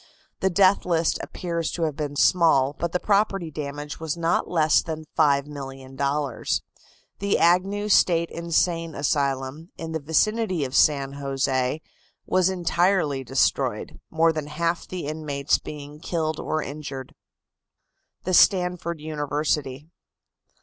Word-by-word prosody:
The 190 - +2
death 190 +1 +4
list 165 -2 +1
appears 170 -2 -3
to 170 - -2
have 155 -3 -1
been 145 -1 -4
small, 145 -5 +4
but 170 -1 -1
the 180 - 0
property 195 -5 +1
damage 145 0 -6
was 160 0 -3
not 170 0 0
less 155 -3 +3
than 160 -1 -6
$5,000,000. 140 -2 -1 0.6
The 200 0 +1
Agnew 195 +4 +2
State 170 -4 +3
Insane 165 -1 0
Asylum, 140 +2 -1
in 165 0 -6
the 160 - -2
vicinity 180 +3 +1
of 130 - -7
San 140 -2 +3
Jose, 135 0 -1 0.4
was 185 0 +2
entirely 175 -5 +1
destroyed, 130 +1 0
more 165 0 +3
than 155 -2 -4
half 165 +3 -2
the 180 -4 -5
inmates 145 -2 -1
being 145 0 -9
killed 160 -2 -2
or 155 -1 -2
injured. 140 -2 -7 1.1
THE 185 - -2
STANFORD 180 -3 +3
UNIVERSITY. 150 -2 -2
155 Hz, 125 wpm, -24 LUFS, 140-170 Hz, 1.1 s, death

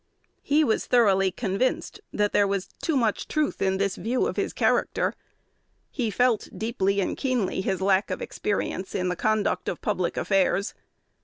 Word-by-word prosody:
He 300 +2 +3
was 225 -7 0
thoroughly 195 -6 +4
convinced 195 +7 -2
that 210 0 0
there 205 - +4
was 195 -1 -1 0.2
too 315 -4 +1
much 225 -5 0
truth 305 -1 -1
in 190 0 +2
this 195 -1 -1
view 245 +3 0
of - - -2
his - - -1
character. - - +1 0.8
He 245 -5 -1
felt 245 0 +1
deeply 200 -3 0
and - - -1
keenly 250 -9 -1
his 190 0 -2
lack 195 +1 +2
of - - -3
experience 195 -2 -3
in 180 -1 0
the 180 - -1
conduct 215 +3 0
of - - -4
public - - -1
affairs. 195 0 +1
200 Hz, 165 wpm, -26 LUFS, 190-240 Hz, 0.8 s, thoroughly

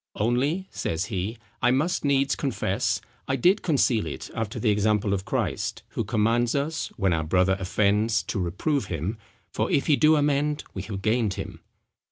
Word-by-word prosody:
"Only," 135 - 0
says 80 +3 -2
he, 100 +5 -2 0.2
"I 125 - +4
must 145 +8 +1
needs 140 -1 +2
confess, 135 -5 -1 0.3
I 135 - +1
did 180 - +3
conceal 130 - +2
it 75 - -6
after 110 -3 -3
the 110 - +2
example 105 0 +2
of 95 -1 -2
Christ, - - -2
who - - -2
commands 115 +3 +1
us, 150 +3 -1
when 95 -4 +2
our 80 -1 0
brother 90 +4 +2
offends 105 +4 +1
to 100 - -3
reprove 100 - -1
him, 90 +6 -3 0.3
for - - -1
if 140 - +2
he 150 - +4
do 155 +2 +5
amend 145 0 +1
we - - -4
have 100 -3 -6
gained 110 -3 +1
him." - - -6
115 Hz, 175 wpm, -26 LUFS, 100-140 Hz, 0.3 s, do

